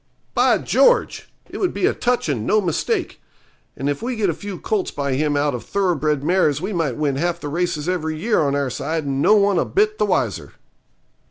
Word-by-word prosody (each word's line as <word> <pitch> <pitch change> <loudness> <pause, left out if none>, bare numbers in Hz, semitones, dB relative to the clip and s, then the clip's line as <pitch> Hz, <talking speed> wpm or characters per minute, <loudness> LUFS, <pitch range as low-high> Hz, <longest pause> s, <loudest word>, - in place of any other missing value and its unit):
'By - - +4
George! - - +2 0.2
it - - -8
would 370 - -1
be 200 - +1
a - - +2
touch, 245 -5 0
and 130 -8 -1
no 215 - +4
mistake. 175 -6 -2 0.6
And 135 - -3
if 145 +5 -2
we 250 +2 -2
could 220 - -6
get 200 - +2
a - - -4
few 200 +2 -7
colts 410 - -1
by 140 -2 -2
him 145 +2 0
out 145 0 +1
of 120 -3 -5
thoroughbred 155 -4 0
mares 155 -4 +2
we 190 +5 -4
might 160 -8 -1
win 145 -3 0
half 170 +3 -1
the 145 - -5
races 170 -1 -2
every 160 -4 -2
year 215 +7 +1
on 140 -2 +1
our 140 -2 -1
side 150 +4 -3
and 135 0 -1
no 210 - +5
one 200 -2 +3
a - - +2
bit 425 +2 +1
the - - +2
wiser.' - - -1
165 Hz, 225 wpm, -21 LUFS, 145-200 Hz, 0.6 s, no